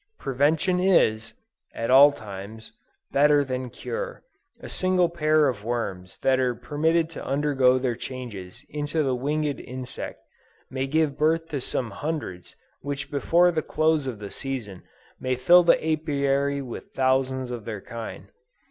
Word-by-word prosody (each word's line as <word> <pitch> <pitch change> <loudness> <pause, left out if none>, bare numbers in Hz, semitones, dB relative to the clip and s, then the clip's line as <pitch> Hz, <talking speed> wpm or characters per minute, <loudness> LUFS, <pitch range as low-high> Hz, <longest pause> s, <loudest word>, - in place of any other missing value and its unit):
"Prevention 150 +7 +1
is," 170 - +2 0.4
at 115 +2 -2
all 140 +3 +9
times, 105 -2 -9 0.4
"better 145 +1 +4
than 130 -1 -4
cure": - - -6 0.4
a - - -9
single 185 -2 +2
pair 155 -2 +3
of 120 -6 -3
worms 100 -6 -4
that 130 -1 +3
are 125 -2 +1
permitted 160 +5 +1
to 165 - -7
undergo 135 -2 +2
their 125 -1 0
changes 110 -9 -8
into 150 +1 -2
the 135 -2 0
winged 145 +3 -1
insect, 130 0 -7 0.5
may 130 +1 -2
give 150 0 0
birth 165 +2 +2
to 145 -4 -3
some 125 -2 -2
hundreds 120 - -5 0.2
which 140 0 -5
before 170 +5 +3
the 160 -2 -1
close 155 -2 +1
of 125 -4 -4
the 100 -1 -8
season, 120 -9 -5 0.4
may 130 0 -1
fill 170 +8 +6
the 170 - +5
Apiary 140 -2 0
with 120 -3 -9
thousands 130 -1 +1
of 120 -4 -6
their 110 -3 -5
kind. 115 +1 -8
135 Hz, 150 wpm, -25 LUFS, 125-155 Hz, 0.5 s, all